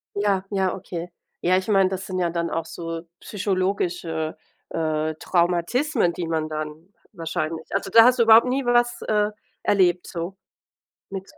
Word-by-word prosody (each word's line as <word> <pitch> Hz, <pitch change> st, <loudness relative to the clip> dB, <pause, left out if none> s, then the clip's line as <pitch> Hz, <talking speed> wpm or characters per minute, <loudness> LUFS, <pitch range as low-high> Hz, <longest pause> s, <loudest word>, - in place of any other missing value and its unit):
Ja, 200 Hz, -2 st, +1 dB
ja, 190 Hz, -2 st, 0 dB
okay. 175 Hz, -2 st, -6 dB, 0.3 s
Ja, 180 Hz, +1 st, +3 dB
ich 185 Hz, -, -2 dB
meine, 195 Hz, -3 st, +4 dB
das 190 Hz, 0 st, -4 dB
sind 185 Hz, -1 st, -3 dB
ja 175 Hz, -1 st, +1 dB
dann 170 Hz, 0 st, -2 dB
auch 165 Hz, -1 st, -2 dB
so 165 Hz, 0 st, -6 dB, 0.2 s
psychologische, 185 Hz, -5 st, -2 dB, 0.3 s
äh, 155 Hz, -1 st, -1 dB
Traumata, 180 Hz, -, +1 dB
die 170 Hz, -1 st, -4 dB
man 160 Hz, -1 st, -1 dB
dann 155 Hz, +5 st, -6 dB, 0.2 s
wahrscheinlich 165 Hz, -2 st, -3 dB
also, 195 Hz, -, -1 dB
da 230 Hz, -, +9 dB
hast 250 Hz, 0 st, +4 dB
du -, -, +6 dB
überhaupt 225 Hz, +2 st, +7 dB
nie 260 Hz, +1 st, 0 dB
was, 240 Hz, 0 st, +2 dB
äh, 210 Hz, -1 st, +1 dB, 0.3 s
erlebt 180 Hz, -3 st, +2 dB
so, 175 Hz, +1 st, -5 dB, 0.7 s
nix 195 Hz, -1 st, -7 dB
185 Hz, 160 wpm, -24 LUFS, 165-205 Hz, 0.7 s, da